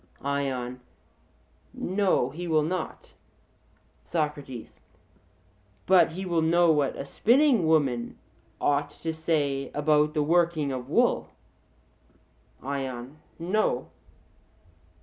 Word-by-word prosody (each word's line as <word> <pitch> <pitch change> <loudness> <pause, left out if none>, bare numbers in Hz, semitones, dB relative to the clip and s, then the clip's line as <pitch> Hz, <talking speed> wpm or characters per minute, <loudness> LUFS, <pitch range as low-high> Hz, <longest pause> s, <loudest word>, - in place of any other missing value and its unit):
ION: 130 -3 -2 1.0
No, 185 -9 +1
he 175 +4 -6
will 155 -2 +3
not. 175 +2 -4 0.9
SOCRATES: 150 -7 -4 1.1
But 175 -4 +5
he 190 +3 -5
will 170 -2 +1
know 170 +1 +4
what 145 -3 +1
a - - -6
spinning 240 - +3
woman 135 -7 +1 0.4
ought 145 0 +1
to 165 -1 -1
say 145 -4 -1
about 150 +1 +2
the 150 - +2
working 165 -2 +2
of 130 -1 -5
wool? - - +2 1.3
ION: 135 0 -5 0.2
No. 175 -6 0
150 Hz, 95 wpm, -27 LUFS, 140-170 Hz, 1.3 s, But